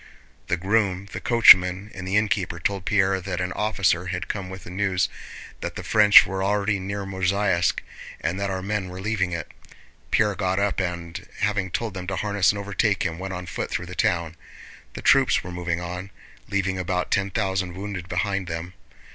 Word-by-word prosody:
The 85 - +1
groom, 100 0 0
the - - -5
coachman, 95 -4 +6
and 95 -1 -7
the 95 +2 +2
innkeeper 105 -5 0
told 95 +1 -2
Pierre 95 -3 +2
that 90 -1 -4
an 90 0 -2
officer 95 -4 +1
had 90 -2 -3
come 100 -3 -4
with 95 0 -9
news 95 0 0 0.5
that - - -5
the - - -6
French 105 -1 +7
were 95 0 -3
already 100 0 +1
near 100 +1 -4
Mozháysk 95 -1 +1 0.4
and 85 +4 -2
that 100 0 -1
our 95 -1 -3
men 100 -2 -2
were 90 +1 -8
leaving 95 -2 -1
it. 85 -3 -5 0.6
Pierre 105 -1 +2
got 95 -1 -1
up 100 -1 0
and, 85 -2 -4
having 100 -2 0
told 110 +3 -3
them 90 -2 -6
to 100 - -2
harness 100 -3 +2
and 105 - -6
overtake 100 0 0
him, 85 -2 -3
went 95 0 -4
on 90 0 -6
foot 90 - -4
through 90 - -3
the 90 - -9
town. 85 -5 0 0.6
The - - -8
troops - - +4
were 90 - -7
moving 85 -1 -2
on, 90 +2 -6 0.4
leaving 95 -1 -1
about 90 0 -2
ten 100 0 +1
thousand 95 -3 -1
wounded 95 -2 -6
behind 100 -4 -1
them. 85 +2 -5
95 Hz, 190 wpm, -24 LUFS, 90-100 Hz, 0.6 s, French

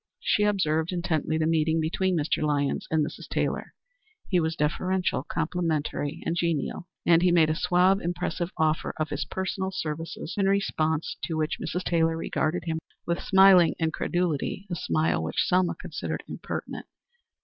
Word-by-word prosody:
She 340 - +2
observed 160 -5 +1
intently 170 -3 -1
the 160 - +1
meeting 160 0 +2
between 175 +3 0
Mr. 155 +1 0
Lyons 145 -2 0
and 155 -2 +2
Mrs. - - -8
Taylor. - - -2 0.5
He 180 - +3
was 160 -1 0
deferential, 180 +3 0
complimentary, 155 -3 -2
and 170 - 0
genial, 170 0 -1 0.2
and 170 -1 +5
he 180 0 +4
made 160 -3 +4
a - - 0
suave, 180 +4 +3
impressive 175 0 -2
offer 155 0 0
of 155 -1 -1
his 145 -1 -2
personal 190 +3 -3
services, 165 -2 -5
in 195 - +3
response 160 -5 0
to 160 - -3
which 155 0 -1
Mrs. 180 +2 -3
Taylor 165 -2 +1
regarded 165 +1 -1
him 160 -1 -2 0.3
with 170 0 -1
smiling 190 -3 +6
incredulity 170 +2 -1
a - - 0
smile 80 - 0
which 80 - 0
Selma 180 -1 +2
considered - - -5
impertinent. - - -6
165 Hz, 155 wpm, -27 LUFS, 155-180 Hz, 0.5 s, smiling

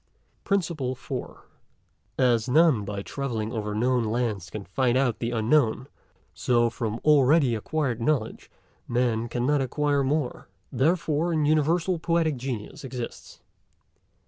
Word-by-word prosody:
PRINCIPLE 165 -10 -1
FOURTH. - - -7 0.7
As 125 -2 +2
none 150 -5 +4
by 100 0 -5
travelling 115 -5 -4
over 105 -2 -3
known 125 +2 +1
lands 110 -5 -2
can 100 +1 -7
find 125 +6 +1
out 130 -4 +1
the 115 - -2
unknown; 120 +2 +1 0.5
so 120 -2 +1
from 115 -1 -3
already 145 -2 +5
acquired 125 +1 -2
knowledge 120 -3 -1 0.4
Man 120 -1 0
could 120 +1 -2
not 145 +2 +2
acquire 145 +2 0
more; 135 -4 -2 0.2
therefore 165 +2 +1
an 155 -2 +1
universal 165 +4 +2
Poetic 165 -3 +1
Genius 120 -3 -6
exists. 125 -3 -7
130 Hz, 125 wpm, -26 LUFS, 115-150 Hz, 0.7 s, already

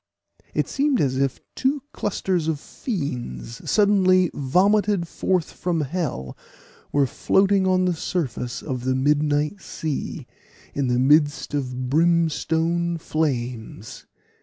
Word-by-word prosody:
It - - +1
seemed 280 -2 +1
as 130 -2 +1
if 135 -1 0
two 270 +1 0
clusters 185 -4 -1
of 160 -3 0
fiends, 125 - -5
suddenly 185 -4 +4
vomited 190 +6 +2
forth 180 0 -1
from 175 -3 -1
hell, 140 - -3 0.6
were 145 -1 +3
floating 195 +7 +2
on 185 0 +3
the 180 - +2
surface 130 -7 -3
of 130 -4 -4
the 130 0 +1
midnight 150 +5 +1
sea, 155 -4 -4 0.5
in 140 -2 0
the 125 0 +1
midst 145 +3 +3
of 130 -3 -2
brimstone 170 +1 +2
flames. 125 - -3
155 Hz, 115 wpm, -23 LUFS, 130-185 Hz, 0.6 s, suddenly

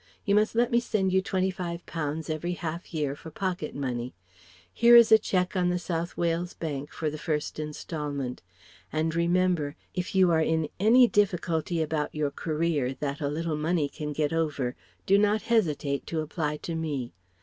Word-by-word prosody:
You 200 - +2
must 210 +2 +3
let 240 +2 +2
me 235 - +4
send 200 -5 0
you 190 - +4
twenty 190 0 0
five 175 -2 -5
pounds 155 -1 -3
every 165 +2 -2
half 170 0 -5
year 150 -4 -1
for 160 - -10
pocket 180 -1 -3
money. 125 -4 -3 0.6
Here 235 0 +6
is 235 -2 +8
a 220 - +9
cheque 185 -2 0
on 180 -1 +2
the 180 - +1
South 170 -1 -3
Wales 170 +1 -1
Bank 145 -3 -4
for 155 -2 -2
the 155 - -6
first 150 -2 -2
instalment. 150 -4 -4 0.5
And 155 +1 0
remember, 170 -3 +1 0.2
if 180 +1 -3
you 185 -2 +5
are 160 -1 +3
in 160 -1 +1
any 240 +5 +6
difficulty 175 -5 +1
about 150 -1 -2
your 150 -2 0
career 155 -4 -1
that 140 +2 -4
a 145 - 0
little 155 +2 -2
money 155 0 +1
can 150 +1 -5
get 150 +1 -1
over 145 -6 -1 0.3
do 200 +1 +5
not 210 +1 +2
hesitate 155 -11 0
to 160 -2 -1
apply 150 -1 -2
to 170 - -3
me. 145 - -3
165 Hz, 185 wpm, -27 LUFS, 150-185 Hz, 0.6 s, a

